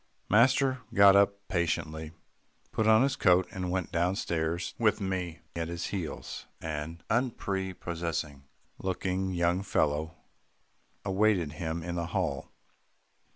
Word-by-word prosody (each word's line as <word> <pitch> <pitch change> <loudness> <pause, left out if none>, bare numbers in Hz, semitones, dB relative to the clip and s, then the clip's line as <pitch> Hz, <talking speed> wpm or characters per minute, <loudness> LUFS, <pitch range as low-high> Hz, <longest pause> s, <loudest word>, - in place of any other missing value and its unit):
Master 130 +4 +4
got 100 -1 +8
up 100 0 +3
patiently, 80 -3 -1 0.6
put 110 - +1
on 110 +2 +6
his 135 -1 +1
coat, 90 -1 +4
and 90 -1 -3
went 90 -1 -2
down 90 +3 +1
stairs 85 -2 -2
with 105 -3 +3
me 90 -4 -3
at 85 -1 -2
his 85 0 -4
heels. 90 -6 -5
An 80 +1 -5
unprepossessing 85 - -2 0.4
looking 95 0 -1
young 85 +1 +1
fellow 80 -4 0 0.9
awaited 95 -5 +2
him 80 +1 -4
in 85 +1 -4
the 85 -1 -2
hall. 85 -7 -2
90 Hz, 120 wpm, -29 LUFS, 80-100 Hz, 0.9 s, got